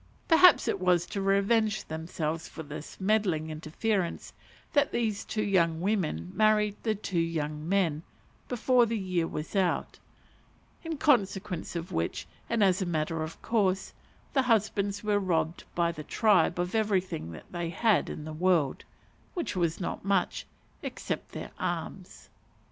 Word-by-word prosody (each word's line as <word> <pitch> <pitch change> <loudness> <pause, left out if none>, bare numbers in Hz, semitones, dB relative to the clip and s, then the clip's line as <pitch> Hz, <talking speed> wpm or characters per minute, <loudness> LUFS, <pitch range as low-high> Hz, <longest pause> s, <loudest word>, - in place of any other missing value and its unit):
Perhaps 345 +1 +7
it - - 0
was 180 -2 +3
to 200 - -4
revenge 205 +2 +2
themselves 160 0 -3
for 160 - -8
this 150 +1 -9
meddling 190 -6 +1
interference 170 +4 -2 0.4
that 285 -1 +3
these 220 -4 -1
two 215 - -2
young 170 -5 +2
women 165 - -1
married 210 -1 +3
the 220 -2 0
two 195 -3 -2
young 155 -1 -2
men 175 -6 +2 0.5
before 245 0 +3
the 225 0 -1
year 180 -4 -1
was 150 +5 -6
out; 185 -3 0 0.8
in 325 -2 -4
consequence 200 - +1
of 170 +1 -4
which, 80 0 -2 0.2
and 230 -2 +2
as 190 0 +3
a - - 0
matter 160 -1 -1
of 155 +1 -5
course, 195 -4 +1 0.4
the 270 - +4
husbands 205 -4 +1
were 210 -1 +2
robbed 170 -3 -1
by 170 -1 +2
the 155 -2 -8
tribe 210 +3 +3
of 175 +1 -2
everything 190 - -1
they 170 -1 -3
had 210 +4 +2
in 150 - -6
the 155 - -6
world 165 -4 +1 0.5
(which 345 - -2
was 170 -3 0
not 180 - -4
much), 195 -2 0 0.3
except - - -4
their - - -7
arms. - - -5
185 Hz, 150 wpm, -29 LUFS, 165-215 Hz, 0.8 s, Perhaps